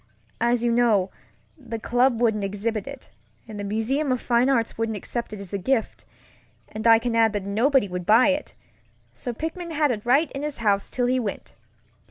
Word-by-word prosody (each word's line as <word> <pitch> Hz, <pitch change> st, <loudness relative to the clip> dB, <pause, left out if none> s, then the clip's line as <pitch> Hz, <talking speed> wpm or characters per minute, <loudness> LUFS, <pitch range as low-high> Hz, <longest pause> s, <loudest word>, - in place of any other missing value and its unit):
As 235 Hz, 0 st, +1 dB
you 240 Hz, -, +2 dB
know, 225 Hz, -6 st, +2 dB, 0.4 s
the 240 Hz, -6 st, -7 dB
club 245 Hz, +1 st, +1 dB
wouldn't 220 Hz, -4 st, +1 dB
exhibit 205 Hz, +4 st, -3 dB
it, 275 Hz, -2 st, -10 dB, 0.4 s
and 215 Hz, -2 st, -8 dB
the -, -, -4 dB
Museum 230 Hz, +8 st, -1 dB
of 255 Hz, -, 0 dB
Fine 240 Hz, +2 st, +2 dB
Arts 235 Hz, -4 st, +1 dB
wouldn't 225 Hz, -1 st, -2 dB
accept 235 Hz, +4 st, -5 dB
it 210 Hz, -, -7 dB
as 195 Hz, -2 st, -10 dB
a 200 Hz, -, -1 dB
gift; 230 Hz, +4 st, -1 dB, 0.6 s
and 215 Hz, +2 st, -3 dB
I 225 Hz, 0 st, +8 dB
can 230 Hz, 0 st, -2 dB
add 225 Hz, -1 st, +3 dB
that 205 Hz, -2 st, -3 dB
nobody 230 Hz, +4 st, +2 dB
would 180 Hz, -1 st, -6 dB
buy 230 Hz, +6 st, +6 dB
it, 285 Hz, +1 st, -2 dB, 0.6 s
so 185 Hz, -, -5 dB
Pickman 325 Hz, +7 st, -5 dB
had 300 Hz, -3 st, +1 dB
it 210 Hz, -3 st, -4 dB
right 275 Hz, +6 st, +2 dB
in 275 Hz, -, -5 dB
his 300 Hz, -1 st, -3 dB
house 205 Hz, -3 st, 0 dB
till 245 Hz, -, -1 dB
he 255 Hz, +1 st, +1 dB
went. 210 Hz, -5 st, -5 dB
230 Hz, 200 wpm, -24 LUFS, 210-260 Hz, 0.6 s, I